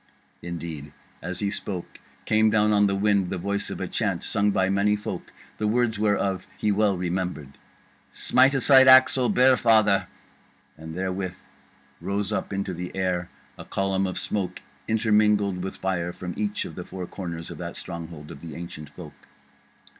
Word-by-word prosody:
Indeed 80 -4 -6 0.3
as 90 +1 -4
he 100 -1 0
spoke 95 -4 -6 0.3
came 110 0 +4
down 105 0 +3
on 105 0 +4
the 100 - 0
wind 100 -2 +2
the 95 - -3
voice 100 +3 -2
of - - -6
a - - -3
chant, - - -1
sung 100 0 +1
by 95 -2 +2
many 100 +2 +2
folk, 105 - -6 0.3
the 105 - 0
words 115 -1 +1
whereof 100 -3 0
he 105 - +1
well 100 -1 +2
remembered: 90 -6 -3 0.5
SMITE 130 +2 +3
ASIDE 135 0 +7
AXE, 130 0 +8
O 125 - +2
BEAR 130 +1 +5
FATHER. 110 -5 +3 0.7
And 80 +1 -9
therewith 95 0 -3 0.7
rose 100 +1 -2
up 105 - -2
into 100 -1 -2
the 90 +2 -6
air 90 -2 -1 0.3
a - - -7
column 95 0 0
of 90 - -4
smoke 90 -7 -3 0.2
intermingled 105 -4 +2
with 95 - -4
fire 90 -2 -2
from 90 0 -6
each 105 -1 -2
of - - -8
the 90 - -6
four 90 0 -7
corners 85 -3 -6
of - - -9
that - - -6
stronghold 80 -3 -8
of 70 - -11
the 80 -3 -8
Ancient 80 -3 -8
Folk. - - -13
95 Hz, 170 wpm, -25 LUFS, 90-105 Hz, 0.7 s, AXE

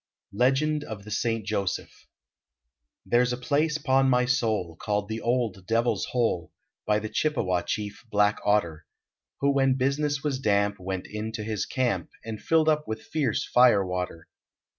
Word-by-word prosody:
LEGEND 135 +7 +2
OF 105 -3 -7
THE 105 - -10
ST. 115 0 -1
JOSEPH 100 -3 -3 1.0
There 120 - +3
s 125 0 +1
a 125 - -2
place, 150 +4 +1
pon 135 -2 +2
my 125 -1 +3
soul, 110 -9 0
Called 105 0 -1
the 110 +1 -4
"Old 115 -6 -1
Devil 115 +1 +2
s 95 - -3
Hole," 115 -9 -1 0.4
By 105 0 +3
the 110 +1 -3
Chippewa 105 - 0
chief, 105 +3 -4
Black 105 0 +2
Otter, 85 -7 0 0.5
Who 140 0 +3
when 135 -1 +3
business 140 +2 0
was 140 -3 -1
damp 100 -4 +1
Went 95 0 -4
into 110 +1 -5
his 105 -2 -2
camp, 130 -2 -1 0.2
And 110 -2 -6
filled 160 -1 +2
up 150 -1 +2
with 110 0 -4
fierce 140 -8 -1
fire 120 -6 +5
water. 90 -2 -4
115 Hz, 160 wpm, -26 LUFS, 105-135 Hz, 1.0 s, fire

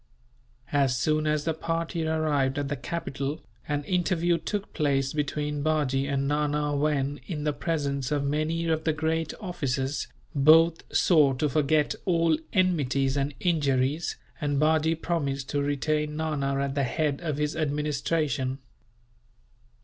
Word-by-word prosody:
As 135 -3 +2
soon 155 +4 +1
as 150 -1 +1
the 160 - 0
party 165 0 -2
arrived 150 -4 +1
at 145 -1 -2
the 145 - -1
capital, 140 0 -4 0.2
an 145 -1 -1
interview 175 0 +1
took 205 -1 -4
place 135 -3 +1
between 150 0 -2
Bajee 140 -3 +1
and 140 0 0
Nana 150 0 0
when, 145 -1 0
in 155 -5 -4
the 150 -1 0
presence 140 -4 -2
of 145 -1 +1
many 155 +4 0
of 160 -1 0
the 160 - +1
great 160 +1 -1
officers, 145 -7 -2 0.3
both 160 +3 +5
swore 150 -6 +4
to 150 +4 +1
forget 150 +1 +2
all 165 -3 +3 0.2
enmities 140 -7 +1
and 140 0 -1
injuries, 145 -2 +1 0.3
and 145 -2 0
Bajee 160 +1 +3
promised 140 -6 -2
to 145 - 0
retain 150 +1 -1
Nana 140 -4 -1
at 140 0 -1
the 140 - 0
head 145 +3 -1
of 155 -4 -2
his 150 +1 -1
administration. 150 -2 -1
150 Hz, 140 wpm, -27 LUFS, 140-160 Hz, 0.3 s, both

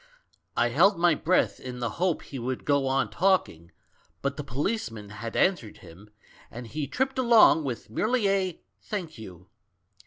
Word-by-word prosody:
I - - +3
held 200 -1 +4
my 170 0 +4
breath 175 +4 +1
in 125 -1 -7
the 120 -2 -3
hope 180 -3 +1
he 135 - -8
would 125 +1 -4
go 140 -2 +2
on 135 +1 0
talking, 170 - 0 0.5
but 140 0 -1
the 150 - -5
policeman 130 - -3
had 110 +3 -7
answered 175 - +1
him, 95 +6 -15 0.4
and 120 +1 -8
he 145 +5 -4
tripped 265 - -1
along 235 -9 +6
with 125 -4 -5
merely 215 - +1
a 190 -3 -1 0.2
'Thank 175 - -6
you.' 90 -4 -11
140 Hz, 160 wpm, -27 LUFS, 115-190 Hz, 0.5 s, along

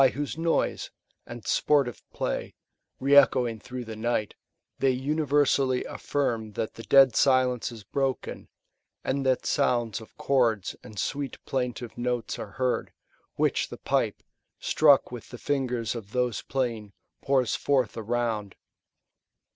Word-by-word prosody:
whose 145 0 -3
noise, 165 +1 0 0.4
and 120 -2 -9
sportive 140 -5 +2
play, - - -3 0.4
re 140 +2 +3
echoing 125 -5 +5
through 125 +2 -7
the 110 0 -7
night, 110 -1 -1 0.5
they 135 - +3
universally 140 -1 +1
affirm 115 -7 -2
that 110 - -3
the - - -9
dead 135 0 +6
silence 130 -3 +3
is 115 -3 -10
broken, 135 +5 -3 0.5
and 135 +1 -1
that 130 -1 +1
sounds 120 -3 +1
of 110 - -15
chords 115 -7 +1
and 105 - -12
sweet 140 +4 -2
plaintive 125 -3 -3
notes 120 -2 -2
are 100 -2 -7
heard, 130 +1 -1 0.4
which - - +1
the - - -8
pipe, - - -1 0.3
struck 145 -5 +4
with 120 -3 -8
the 125 - -8
fingers 125 -4 -1
of 110 -4 -8
those 125 -2 0
playing, 115 -6 -3 0.3
pours 130 -5 +2
forth 130 -6 +1
around. 115 -3 -2
125 Hz, 130 wpm, -27 LUFS, 115-135 Hz, 0.5 s, dead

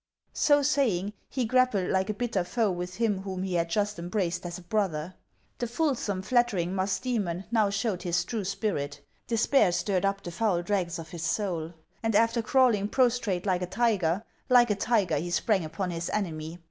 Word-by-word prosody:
So 290 -1 +4
saying, 225 -9 +1 0.2
he 255 -2 -1
grappled 240 -6 +2
like 190 +1 +1
a 215 - -1
bitter 220 -5 -1
foe 215 +3 0
with 180 +1 -5
him 210 -3 0
whom 190 -1 -4
he 190 -1 -3
had 170 -1 +1
just 205 +1 -1
embraced 175 0 -2
as 175 - -6
a 180 - -12
brother: 180 -4 -1 0.5
the 240 - -1
fulsome, 235 -8 -1
flattering 210 -7 +1
Musdomion 195 -1 -1
now 220 -3 +3
showed 200 -1 -1
his 175 -1 0
true 225 -4 -3
spirit. 185 -8 -2 0.3
Despair 230 -2 +3
stirred 185 +1 0
up 195 0 0
the 175 - -5
foul 180 -2 0
dregs 180 -3 -1
of 165 -1 -8
his 170 -1 -7
soul; 170 -2 -2 0.3
and 225 -2 0
after 230 +2 +3
crawling 225 -4 +3
prostrate 230 -7 +1
like 185 -2 +1
a 180 - -2
tiger, 200 -4 +1 0.3
like 240 -3 +6
a - - +2
tiger 200 -7 +1
he 170 +4 -3
sprang 190 +2 +1
upon 180 +4 -3
his 170 0 -3
enemy. 165 -4 -3
195 Hz, 185 wpm, -28 LUFS, 175-225 Hz, 0.5 s, like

